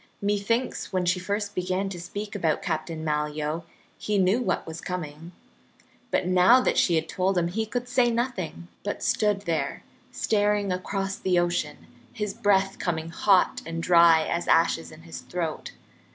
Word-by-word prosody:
Methinks 205 +5 -1
when 185 -1 0
she 180 +1 +1
first 205 +2 -3
began 185 +1 -1
to 180 -2 -7
speak 205 +4 -6
about 165 -7 0
Captain 160 0 -3
Malyoe 150 +1 -2 0.3
he 210 -1 -1
knew 195 +6 +3
what 190 -6 -1
was 160 0 -7
coming. 165 -2 -6 0.8
But - - +1
now 185 +7 +6
that 255 - +1
she 175 - +3
had 160 0 0
told 190 +2 0
him, 170 -1 +1
he 220 +5 -2
could 245 +2 -3
say 245 -1 +3
nothing, 230 -8 -3 0.2
but 205 - -4
stood 210 -2 +1
there 165 -4 -2 0.3
staring 205 -2 +1
across 195 +1 -2
the 185 -1 +1
ocean, 175 0 -1 0.3
his 210 -3 -3
breath 195 -1 +1
coming 165 -2 -2
hot 190 +2 +3
and 165 0 -5
dry 170 -2 +6
as 170 0 -2
ashes 85 - +2
in - - -14
his 85 0 -8
throat. 170 -3 -4
180 Hz, 165 wpm, -26 LUFS, 165-205 Hz, 0.8 s, now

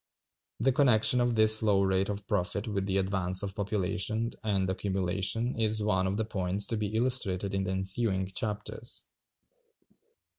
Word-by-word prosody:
The 135 +3 +2
connection 125 -2 +3
of 120 -1 +1
this 110 0 +7
low 100 -3 +2
rate 95 +1 +1
of 100 0 -4
profit 100 +1 -1
with 100 -2 -2
the 95 0 0
advance 95 -1 0
of 100 -1 -3
population 105 +3 -2
and 100 -3 0
accumulation 95 +5 -1
is 110 -1 0
one 95 -3 +1
of 95 +2 -2
the 110 - -1
points 100 -2 -2
to 115 - -1
be 105 0 -3
illustrated 110 -6 0
in 95 0 -1
the 95 - -2
ensuing 95 +1 +1
chapters. 105 +4 -5
100 Hz, 155 wpm, -29 LUFS, 95-110 Hz, -, this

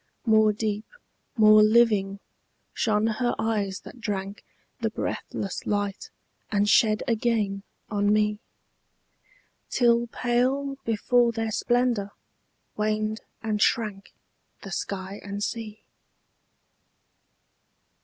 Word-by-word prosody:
More 220 -2 +5
deep, 210 0 -3 0.5
more 215 -1 +7
living, 215 -3 +3 0.5
shone 215 -1 +1
her 225 +2 0
eyes 210 -3 -1
that 245 - -13
drank 200 -1 -4 0.4
The - - 0
breathless 195 - -4
light 205 -1 -2 0.4
and 205 -1 +2
shed 215 -1 +4
again 220 -4 0 0.3
on 205 0 +2
me, 210 0 +2 1.3
Till 235 -1 +3
pale 255 +4 0
before 235 +2 +2
their 225 -1 -3
splendour 240 -3 0 0.6
waned 215 +1 -1 0.2
and 215 -1 -1
shrank 210 -4 0 0.5
The 195 - -8
sky 195 +2 -4
and 200 +1 -4
sea. 220 -2 -5
215 Hz, 95 wpm, -26 LUFS, 205-230 Hz, 1.3 s, more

